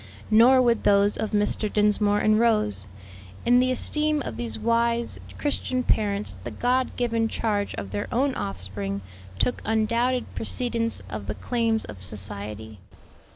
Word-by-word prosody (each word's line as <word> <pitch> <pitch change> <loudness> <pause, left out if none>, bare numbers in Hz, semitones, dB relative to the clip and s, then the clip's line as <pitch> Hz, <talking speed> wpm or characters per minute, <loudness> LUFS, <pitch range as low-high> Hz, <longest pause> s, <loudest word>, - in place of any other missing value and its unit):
Nor 250 +4 +7
would 235 -2 +2
those 200 0 +4
of 220 - -2
Mr. 210 0 0
Dinsmore 210 0 +3
and 215 0 +4
Rose. 105 - +1 0.6
In 245 +1 +5
the 255 0 +3
esteem 300 +3 0
of 115 - -5
these 115 -1 -4
wise, 235 - 0 0.2
Christian 255 -3 -1
parents 205 -3 0
the - - -4
God 255 +1 0
given 230 -2 0
charge 210 -2 -1
of 100 -1 -6
their 100 - -3
own 265 +3 +1
offspring 100 - -4 0.4
took 245 - 0
undoubted 230 +3 +1
precedence 230 -1 -2
of 105 -2 -6
the 105 - -3
claims 225 - 0
of 100 -3 -10
society. 105 +2 -5
215 Hz, 145 wpm, -25 LUFS, -, 0.6 s, Nor